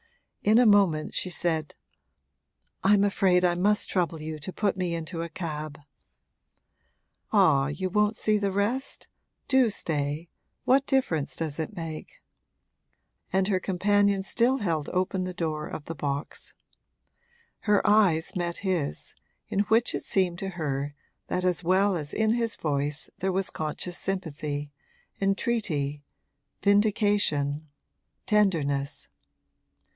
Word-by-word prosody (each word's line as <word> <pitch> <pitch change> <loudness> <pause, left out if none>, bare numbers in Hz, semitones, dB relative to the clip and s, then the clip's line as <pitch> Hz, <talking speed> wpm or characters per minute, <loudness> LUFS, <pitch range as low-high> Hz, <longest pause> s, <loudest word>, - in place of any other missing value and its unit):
In 215 +2 +5
a 245 - +6
moment 195 -8 +4
she 185 - -1
said: 160 -3 -1 1.1
'I'm 200 +1 +5
afraid 185 -3 +3
I 175 - +3
must 205 +4 +1
trouble 170 -3 -1
you 155 0 -5
to 150 +6 -6
put 200 0 0
me 180 -2 -1
into 165 +1 -4
a 170 - -4
cab.' 155 -3 -5 1.5
'Ah, 135 -3 +4
you 185 +5 -3
won't 210 +2 +2
see 215 -1 +2
the 200 -1 0
rest? 215 +8 -1 0.4
Do 260 -3 +4
stay 150 -4 -3 0.4
what 270 +2 +4
difference 170 - 0
does 160 -2 -3
it 160 +7 -4
make?' 165 -3 -7 1.1
And 190 0 +2
her 190 -2 +2
companion 200 +1 +2
still 240 +6 +2
held 165 - -1
open 185 +1 0
the 185 0 -5
door 155 -3 -2
of 145 - -7
the 165 - -5
box. 140 -1 -4 1.0
Her 210 -2 +2
eyes 190 -7 +3
met 175 -1 -2
his, 175 - -2 0.4
in 195 - -1
which 230 +2 +3
it - - -2
seemed 180 -3 +1
to 195 - -3
her 145 -5 -3 0.3
that 180 0 -1
as 180 0 +1
well 190 +3 +3
as 150 -3 -4
in 220 0 +2
his 230 -1 0
voice 145 0 -1
there 190 +1 0
was 190 +1 -1
conscious 160 +3 -3
sympathy, 150 -6 -3 0.5
entreaty, 195 - 0 0.6
vindication, 200 -8 +2 0.6
tenderness. 150 -10 +1
180 Hz, 130 wpm, -27 LUFS, 155-205 Hz, 1.5 s, a